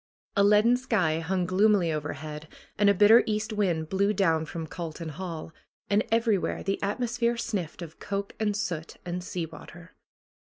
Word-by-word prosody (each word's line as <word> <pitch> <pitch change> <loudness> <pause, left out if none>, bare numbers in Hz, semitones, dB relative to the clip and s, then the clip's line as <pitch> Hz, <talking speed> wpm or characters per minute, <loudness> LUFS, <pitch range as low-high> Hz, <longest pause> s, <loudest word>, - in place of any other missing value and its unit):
A 200 - +4
leaden 210 +4 +5
sky 190 -11 +1
hung 180 +2 -1
gloomily 190 -1 +3
overhead 150 +1 -5 0.3
and 205 0 +4
a - - +6
bitter 210 +4 +7
east 215 0 -1
wind 175 -7 0
blew 200 +2 +2
down 165 -5 +1
from 165 0 -5
Calton 165 0 -6
Hall, 165 -1 -6 0.4
and 205 +1 +4
everywhere 225 -4 +1
the 195 - -2
atmosphere 235 +3 0
sniffed 195 -8 -3
of 160 -1 -11
coke, 200 0 -4
and 210 -2 0
soot, 165 -5 -4
and 175 0 -4
sea 180 -2 -3
water. 165 +3 -13
190 Hz, 160 wpm, -27 LUFS, 165-210 Hz, 0.4 s, bitter